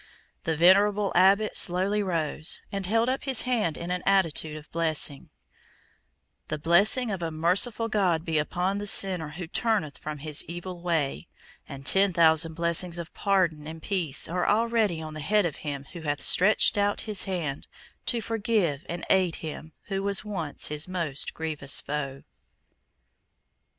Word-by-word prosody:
The 165 -2 0
venerable 200 +4 +4
Abbot 195 +4 +3
slowly 190 +4 +2
rose, 165 -3 -1
and 195 -2 -4
held 225 +3 +1
up 260 +2 -2
his 265 -4 +2
hand 225 -11 -1
in 170 +1 -5
an 180 0 -2
attitude 165 -5 +1
of 150 - -14
blessing: 160 -4 -1 1.2
"The 155 - -3
blessing 200 - +2
of 190 -3 -4
a 165 - -2
merciful 185 +9 +2
God 185 -7 0
be 160 -2 0
upon 180 +6 -2
the 205 - -5
sinner 185 -6 +4
who 175 +4 -7
turneth 165 -4 -1
from 150 0 -6
his 150 0 -2
evil 175 +1 -8
way; 155 - -2 0.4
and 135 0 -9
ten 195 +6 +3
thousand 160 -1 +3
blessings 170 +1 +1
of 170 -1 -7
pardon 175 -7 0
and 160 +1 -8
peace 175 -9 0
are 180 +2 -2
already 215 -6 +1
on 155 0 -8
the 155 - -7
head 205 +6 +1
of 165 - -3
him 140 -2 -6
who 170 - -8
hath 145 -2 -2
stretched 205 +2 +4
out 205 0 0
his 210 -3 0
hand 165 -7 -4 0.4
to 235 -2 +1
forgive 210 -9 -1
and 170 0 -5
aid 185 -3 +2
him 155 0 -8
who 195 -1 -4
was 200 +1 0
once 170 -8 -2
his 150 +2 -1
most 170 -6 -4
grievous 150 -4 +1
foe!" 140 -2 -5
175 Hz, 160 wpm, -26 LUFS, 155-200 Hz, 1.2 s, venerable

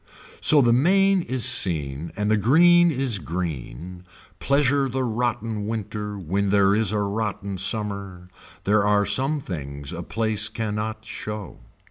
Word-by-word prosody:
So 145 -3 +5
the 120 -1 +3
main 195 +8 +3
is 130 -7 -2
seen 80 - +2
and 105 0 0
the - - +4
green 175 - +5
is 130 -8 -1
green. 85 +1 -6 0.4
Pleasure 140 0 +1
the 130 +1 -2
rotten 115 -3 -2
winter 105 -1 -5
when 100 +3 -2
there 100 0 +3
is 105 -2 +2
a 105 - -1
rotten 100 -2 -3
summer. 100 -3 -2 0.4
There 105 +1 +2
are 105 0 +2
some 135 +7 +2
things 70 - -7
a 85 - -5
place 105 +2 -1
can 110 -1 -4
not 110 +1 -5
show. 105 -3 -7
105 Hz, 145 wpm, -23 LUFS, 95-125 Hz, 0.4 s, So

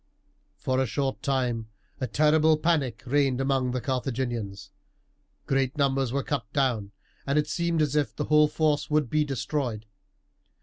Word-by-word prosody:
For 130 0 0
a 130 - 0
short 135 +3 -2
time 125 -5 -1 0.3
a 130 - -1
terrible 155 +5 +4
panic 150 -8 0
reigned 135 -1 +2
among 135 -1 +1
the 125 +1 -1
Carthaginians, 120 -6 -3 0.7
great 135 +1 0
numbers 135 -3 +1
were 140 +1 -1
cut 145 - -3
down, 120 -8 0 0.4
and 140 +2 +1
it 150 - +3
seemed 170 0 0
as 150 -1 -1
if 135 -8 0
the - - -2
whole 150 0 +5
force 150 -1 0
would 150 -5 +1
be 155 0 +3
destroyed. 130 -4 -3
135 Hz, 155 wpm, -27 LUFS, 125-150 Hz, 0.7 s, whole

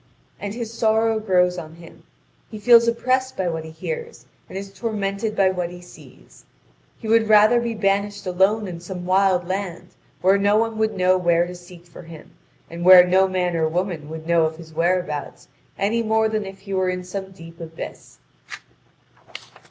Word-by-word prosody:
And 205 +1 -5
his 230 -2 -6
sorrow 225 0 +1
grows 180 -4 +1
on 155 0 -10
him: 170 0 -15 0.5
he 215 - -8
feels 235 +2 +5
oppressed 255 +3 0
by 185 - -1
what 160 -1 -4
he 160 - -9
hears, 475 - -7 0.2
and - - -7
is 195 0 -8
tormented 205 0 -3
by 190 -1 +3
what 180 -2 -3
he 180 0 -10
sees. 175 - -17 0.5
He 225 - -9
would 220 0 +3
rather 215 +3 +6
be 235 -1 -3
banished 200 0 -1
alone 190 +4 +1
in 175 -2 -7
some 180 0 -7
wild 185 -1 +2
land, 185 -2 -4 0.3
where 195 +2 +4
no 205 +1 +3
one 225 0 -1
would 220 -2 0
know 185 0 +3
where 170 -1 +2
to 180 - -8
seek 175 -1 -14
for 170 - -13
him, 165 -2 -13 0.4
and 170 +1 -7
where 180 0 +9
no 190 +1 +3
man 180 -2 -1
or 160 -1 +1
woman 170 -3 -3
would 160 0 -8
know 170 -1 +3
of 160 0 -4
his 160 -1 -13
whereabouts 170 -2 -2 0.3
any 220 +4 0
more 220 0 +1
than 215 -2 -3
if 195 0 -11
he 195 - -7
were 185 -1 +1
in 180 0 -3
some 190 +1 -6
deep 165 -3 -14
abyss. 165 0 -9
190 Hz, 185 wpm, -22 LUFS, 175-215 Hz, 0.5 s, where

